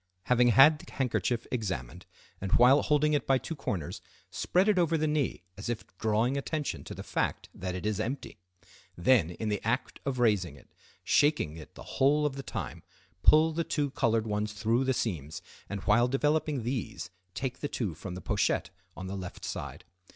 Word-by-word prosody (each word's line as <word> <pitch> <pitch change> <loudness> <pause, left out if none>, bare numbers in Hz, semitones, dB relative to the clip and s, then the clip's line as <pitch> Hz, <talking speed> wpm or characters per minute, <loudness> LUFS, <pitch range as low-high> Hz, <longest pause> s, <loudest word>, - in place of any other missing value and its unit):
Having 125 +3 +4
had 135 +6 +7
the - - -13
handkerchief 120 -2 0
examined, 95 - -4 0.3
and 95 -1 -3
while 130 +4 +6
holding 150 0 +2
it 145 - 0
by 135 - +4
two 135 +6 -5
corners, 95 - -4 0.3
spread 185 +3 +1
it 205 -3 +4
over 165 -1 +2
the 155 - 0
knee 150 - -1 0.2
as 105 - -5
if 120 -2 -3
drawing 110 +5 +1
attention 150 +1 -3
to - - -7
the - - -7
fact - - -2
that 90 0 -4
it 90 - -5
is 105 -1 0
empty. 125 0 -4 0.6
Then, 90 -1 +4
in 105 +5 -4
the 105 - -1
act 125 +4 -1
of 135 -2 -2
raising 105 - +2
it, 65 - -19 0.3
shaking 145 - +2
it 80 - -12
the - - -9
whole 150 +3 +4
of 140 -2 -1
the 135 - -5
time, 135 - -5 0.4
pull 155 - +6
the 170 +2 0
two 145 -3 -1
colored 115 -5 +1
ones 105 0 -2
through 115 +5 +1
the 130 - +2
seams, 80 - -3 0.3
and 100 -1 -4
while 115 +4 +4
developing 145 0 +1
these, 120 -6 -4 0.2
take 130 +4 -3
the 145 - -3
two 105 -9 -2
from 90 +4 -7
the 90 - -7
pochette - - 0 0.3
on 95 - -6
the 95 +1 -5
left 90 -2 -7
side. - - -6
120 Hz, 190 wpm, -29 LUFS, 100-145 Hz, 0.6 s, had